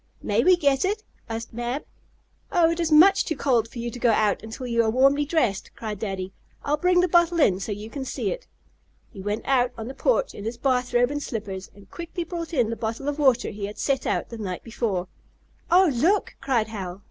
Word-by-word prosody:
"May 210 +3 +2
we 365 +1 +6
get 280 -4 +2
it?" 415 +3 -1 0.3
asked 225 0 -5
Mab. 240 +4 -3 0.7
"Oh, 340 -3 +4
it 335 - -3
is 330 -2 0
much 385 +6 +7
too 320 - -2
cold 240 -5 +1
for 235 - -13
you 235 0 -3
to 245 - -8
go 240 - +3
out 215 -2 +2
until 225 +4 -7
you 235 -1 +2
are 220 - +1
warmly 275 +5 +3
dressed!" 255 - 0
cried 215 -3 -5
Daddy. 190 -3 -4 0.3
"I'll 295 +1 +1
bring 360 +2 +3
the 365 - +2
bottle 345 0 +3
in 190 - +4
so 205 - -4
you 205 +1 -5
can 270 +4 -6
see 260 - -2
it." - - -6 0.6
He 195 - -9
went 205 +2 -3
out 250 -2 +2
on 225 - -6
the 260 - -6
porch - - +1
in 205 - -8
his 225 +2 -4
bath 250 -2 0
robe 245 +2 +4
and 290 0 -3
slippers, 200 -7 -5
and 200 -1 -17
quickly 340 0 -5
brought 335 0 -5
in 245 -8 +1
the - - -2
bottle 230 +5 -4
of 290 +1 -2
water 265 -5 +3
he 205 -1 -5
had 205 - -9
set 275 -2 0
out - - -1
the 230 - -8
night 185 -4 -4
before. 210 -6 -2 0.6
"Oh, 360 -1 +5
look!" 335 - +1
cried 235 -5 +1
Hal. 190 -4 -6
245 Hz, 230 wpm, -25 LUFS, 220-310 Hz, 0.7 s, much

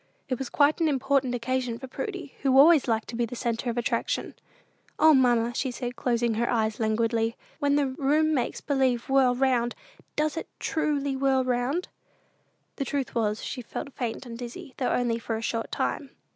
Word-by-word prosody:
It 255 - -1
was 265 -3 -4
quite 295 +3 +3
an 325 - +4
important 270 -2 +1
occasion 245 0 -1
for 260 - -8
Prudy, 375 - -6
who 270 -1 +3
always 300 0 +7
liked 225 -2 0
to 235 - -5
be 235 0 0
the 245 - -7
centre 235 0 -2
of 235 - -3
attraction. 240 - -1 0.6
"O, 315 0 +7
mamma," 240 -3 +3
said 250 0 -2
she, 245 0 -3
closing 240 -1 0
her 235 +2 0
eyes 220 -2 0
languidly, 225 +1 +1 0.2
"when 285 -1 +2
the 290 -1 +3
room 290 +4 +1
makes 260 -5 -1
believe 265 -4 0
whirl 265 -2 +4
round, 245 -2 +1 0.4
does 305 +1 0
it - - -4
truly 285 -3 0
whirl 265 -1 +2
round?" 255 +7 -1 0.9
The 275 - -2
truth 275 -1 -2
was, 215 -2 0
she 255 - -4
felt 275 +4 -7
faint 240 +1 -4
and 230 -1 -8
dizzy, 255 +5 -8
though 255 - 0
only 235 -2 +1
for 225 -1 -3
a 220 - -4
short 225 0 -2
time. 280 - -2
255 Hz, 185 wpm, -27 LUFS, 235-280 Hz, 0.9 s, always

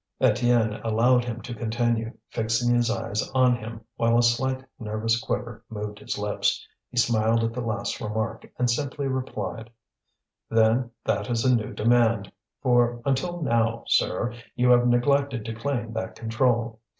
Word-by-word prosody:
Étienne 115 -1 +2
allowed 120 +3 +3
him 120 -1 -5
to 120 - -6
continue, 115 0 -1 0.2
fixing 115 +2 +1
his 120 -1 +2
eyes 110 -2 -2
on 130 -1 +5
him, 115 0 -8 0.2
while 115 0 +3
a 120 - +4
slight 130 +3 +1
nervous 115 +1 -1
quiver 120 0 -4
moved 105 -1 -6
his - - -4
lips. 105 0 -1 0.2
He 125 - -10
smiled 115 -1 +3
at 115 0 -1
the 125 - -3
last 115 -1 -3
remark, 110 0 -3
and 125 - +2
simply 140 +3 -1
replied: 115 -5 -4 0.8
"Then 115 +2 +3 0.2
that - - 0
is 115 -1 0
a 130 -1 +5
new 110 -3 -2
demand, 115 -3 +2 0.3
for 120 -2 +3
until 165 +6 -1
now, 115 -3 +1
sir, 120 0 +1 0.2
you 125 0 +3
have 120 0 +5
neglected 130 0 +2
to 115 - -4
claim 115 -1 -3
that 110 0 -4
control. 115 -1 0
115 Hz, 155 wpm, -25 LUFS, 110-125 Hz, 0.8 s, on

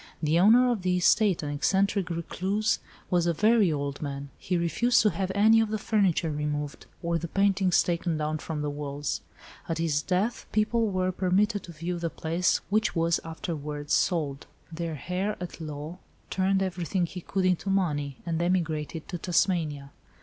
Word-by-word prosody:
The 160 +1 +2
owner 240 +6 +6
of 225 -5 -1
the 180 0 +1
estate, 185 0 +3
an 145 - -3
eccentric 190 +5 +1
recluse, 190 +5 -1 0.3
was 175 -1 +2
a 170 - +1
very 215 -1 +4
old 140 -2 -3
man. 140 -1 -5
He 180 -2 -1
refused 235 +9 +2
to 210 - +4
have 190 -1 -2
any 220 +2 +6
of 225 -1 +1
the 215 - -1
furniture 195 -7 +1
removed, 150 -1 -3 0.2
or 170 0 0
the 170 - -4
paintings 195 0 +3
taken 170 -2 -1
down 155 0 -2
from 150 -1 -4
the 150 - -1
walls. 145 0 -3 0.5
At 165 - -1
his 160 -3 +1
death, 190 +8 -1
people 220 +2 +2
were 185 -2 0
permitted 195 +3 +1
to 175 - -10
view 170 +2 -4
the 170 -1 -1
place, 165 +3 0
which 215 0 +1
was 165 0 +2
afterwards 150 -3 -4
sold. 150 -6 0 0.2
The 165 -1 -4
heir 190 +4 -1
at 175 -1 -7
law 155 +3 -6 0.3
turned 190 0 +2
everything 180 0 -1
he 180 +2 -7
could 190 +2 -1
into 185 +1 +1
money, 145 -8 0
and 165 -1 -1
emigrated 165 -3 -1
to 175 - -4
Tasmania." 160 -6 0
175 Hz, 170 wpm, -27 LUFS, 155-195 Hz, 0.5 s, owner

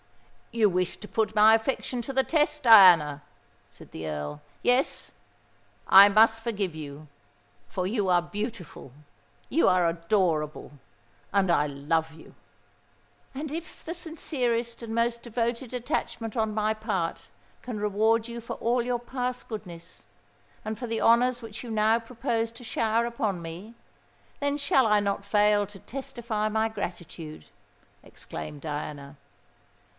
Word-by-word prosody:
"You 225 -2 +4
wished 180 -1 -1
to 210 - -8
put 220 -1 -1
my 215 +1 +7
affection 240 +2 0
to 255 - -6
the 265 0 +2
test, 300 -2 +1
Diana," 175 - +7 0.5
said - - -15
the 80 0 -6
Earl. 75 -1 -5 0.2
"Yes—I 245 -5 +2
must 225 +2 +4
forgive 205 -7 -2
you—for 140 - -9
you 205 -2 0
are 175 -1 +4
beautiful—you 180 - -5
are 180 -2 +3
adorable—and 165 - -2
I 150 -3 +3
love 160 +3 -1
you!" 160 - -15 1.0
"And 285 +2 -5
if 325 +1 -8
the 330 - -4
sincerest 250 -9 -3
and 225 -1 -5
most 235 +1 0
devoted 235 +1 -3
attachment 230 -2 -3
on 220 -2 0
my 215 0 +1
part 205 -6 -3 0.3
can 240 -4 -6
reward 220 +2 +1
you 235 0 -7
for 230 - -6
all 240 +1 +1
your 245 0 -1
past 250 +1 -4
goodness, 180 -6 -9 0.6
and 215 0 -3
for 245 - -5
the 225 -1 -2
honours 245 +2 +3
which 225 +1 -8
you 240 - -8
now 220 +1 +3
propose 230 -1 -2
to 230 - -12
shower 225 0 0
upon 220 -6 -2
me, 175 +8 -9 0.7
then 285 0 0
shall 275 -3 +3
I 210 -1 +4
not 200 -1 -1
fail 205 0 +3
to 200 -1 -14
testify 240 -5 -3
my 220 +1 +1
gratitude," 170 -6 -7 0.6
exclaimed 80 - -8
Diana. 145 -2 -6
215 Hz, 135 wpm, -27 LUFS, 170-235 Hz, 1.0 s, my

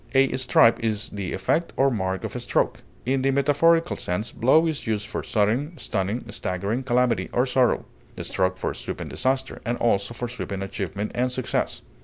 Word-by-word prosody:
A 135 -1 +4
stripe 125 -3 +4
is 110 +1 -1
the 100 -3 -4
effect 160 - 0
or 135 0 +4
mark 95 -4 -2
of - - -5
a - - -2
stroke. - - 0 0.2
In 130 +2 +1
the 135 - +2
metaphorical 150 +5 +3
sense, 105 +6 -2
blow 135 +8 +4
is 155 -6 -2
used 105 -2 0
for - - -3
sudden, 120 - 0
stunning, 105 +1 -2
staggering 100 +7 -2
calamity 125 -2 +1
or 125 - +2
sorrow; 125 -1 +2 0.3
stroke 95 0 0
for - - -2
sweeping - - -5
disaster, 130 0 -1
and 120 +1 -1
also 110 0 +1
for 120 - -3
sweeping 100 -5 -4
achievement 100 +1 -4
and 125 +1 0
success. 125 -1 -2
120 Hz, 175 wpm, -25 LUFS, 100-135 Hz, 0.3 s, A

